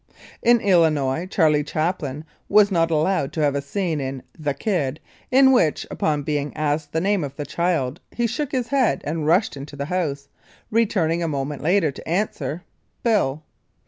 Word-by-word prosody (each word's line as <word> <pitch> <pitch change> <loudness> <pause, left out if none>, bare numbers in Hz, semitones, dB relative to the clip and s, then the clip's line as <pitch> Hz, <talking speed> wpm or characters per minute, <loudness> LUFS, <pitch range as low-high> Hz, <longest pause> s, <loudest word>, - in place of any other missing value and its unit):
In 240 0 +5
Illinois, 160 -4 +2
Charlie 155 -6 +3
Chaplin 155 -1 -2 0.2
was 205 0 +5
not 165 -2 +2
allowed 160 -2 +1
to 160 - -2
have 145 -2 +2
a 140 - -1
scene 160 +1 -2
in 135 -1 -5
"The 145 -4 -2
Kid" 155 -9 -1 0.3
in 265 +1 +6
which 170 - +2
upon 150 -2 0
being 145 0 -2
asked 150 0 -1
the 160 - 0
name 195 0 +1
of 140 -1 -6
the 145 - -5
child 165 -5 -1
he 240 - -1
shook 260 +5 -2
his 250 -3 -1
head 270 -4 +2
and 155 0 -2
rushed 180 +3 +3
into 140 +1 -8
the 140 0 -4
house, 145 -5 -2 0.4
returning 185 -7 +1
a 165 - 0
moment 145 -1 -3
later 170 -1 +2
to 135 - -10
answer, 170 -4 -2 0.4
"Bill." 160 - +1
160 Hz, 175 wpm, -22 LUFS, 145-195 Hz, 0.4 s, in